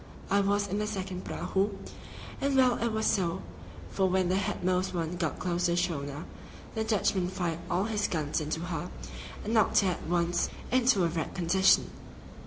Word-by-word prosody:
I 200 - +5
was 205 +1 +1
in 200 +2 -2
the 210 - -1
second 190 -3 -4
prahu, 195 +2 0 0.7
and 275 0 +1
well 255 -2 +4
it 235 - +1
was 220 0 -1
so, 170 - +1 0.5
for 190 - +2
when 185 -1 +2
the 185 - +2
headmost 185 -1 0
one 170 0 -2
got 165 -4 -2
close 175 -1 -1
to 175 - +2
the - - 0
schooner, 145 -4 -2 0.5
the 220 - -1
Dutchman 200 -4 +1
fired 175 -3 -2
all 180 +2 +1
his 210 -1 0
guns 155 -2 -1
into 155 +2 -2
her, 175 +1 -3 0.5
and 220 - -2
knocked 220 -2 +4
her 190 -2 +2
at 175 - -6
once 175 0 +1 0.2
into 250 -6 +4
a - - +4
wrecked 165 -1 -3
condition. 185 +2 +4
185 Hz, 185 wpm, -29 LUFS, 170-205 Hz, 0.7 s, I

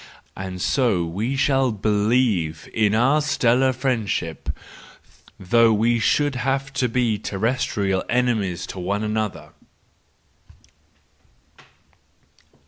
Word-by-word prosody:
—And 95 -1 -6
so 105 -5 +1
we 110 +11 -3
will 135 -2 +2
believe 105 -6 0
in 110 -1 +2
our 135 +7 +3
stellar 130 -2 +2
friendship, 115 - -2 0.9
though 115 +5 +4
we 115 +2 +2
should 145 +4 +1
have 135 +1 -2
to 130 -2 0
be 115 -3 0
terrestrial 100 -3 -1
enemies 115 -8 0
to 95 - -8
one 100 +4 -2
another. 110 -1 -3
115 Hz, 95 wpm, -22 LUFS, 100-125 Hz, 0.9 s, though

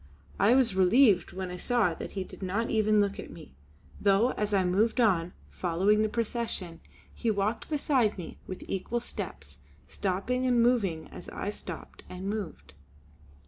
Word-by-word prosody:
I 215 +5 +5
was 260 -6 +3
relieved 190 +2 +4
when 185 -1 -5
I 180 - -5
saw 220 -4 +1
that - - -7
he 195 - -2
did - - -13
not 200 +5 -1
even 215 -1 +3
look 200 -1 +1
at - - -7
me; 65 - -12 0.5
though 205 +5 +4
as 210 0 -2
I 195 -2 +3
moved 210 +7 +2
on, 180 -7 +3 0.2
following 190 +5 +2
the 215 - +1
procession, 220 -7 -3 0.3
he 235 - -2
walked 210 +2 -1
beside 270 -8 +1
me 180 - -8
with 185 - -7
equal 195 +5 -2
steps, 75 - -7 0.3
stopping 210 +7 -1
and 245 -1 +3
moving 200 -10 +1
as - - -10
I 205 - -4
stopped 180 -5 -8
and 185 +1 -6
moved. 205 -4 -5
205 Hz, 165 wpm, -29 LUFS, 185-230 Hz, 0.5 s, I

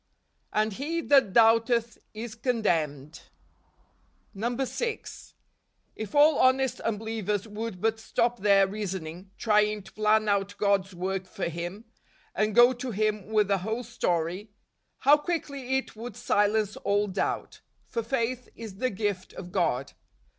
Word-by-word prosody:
" - - -46
And 215 0 +1
he 305 +9 -2
that 275 -10 +4
doubteth 230 +1 +3
is 220 +1 -7
condemned 165 - -1
." - - -23
DECEMBER. 195 - -10 0.2
137 270 - 0 0.3
6. - - -12 0.6
If 215 +2 -6
all 295 +1 +6
honest 260 0 +3
unbelievers 215 -2 -2
would 215 -2 -5
but 225 +2 0
stop 235 +2 0
their 200 0 +5
reasoning, 190 -3 -5
trying 210 -1 +2
to 190 - -15
plan 215 0 +2
out 200 0 0
God's 195 -2 +1
work 185 +1 -3
for 190 -1 -4
Kim, 175 +6 -6 0.5
and 215 -1 0
go 240 +1 +7
to 255 +1 -5
Him 215 -2 -1
with 215 -2 +2
the 200 -1 +1
whole 220 +6 -3
story, 180 -3 -2 0.5
how 290 +2 +6
quickly 280 -5 -2
it 265 - -5
would 225 0 -7
silence 210 -2 +1
all 205 +1 +1
doubt. 190 -1 -3 0.2
For 230 - -3
faith 245 +1 -2
is 220 -4 -9
the 255 +4 0
gift 200 -3 -3
of 180 -1 -9
God. 130 -3 0
215 Hz, 145 wpm, -27 LUFS, 195-235 Hz, 0.6 s, go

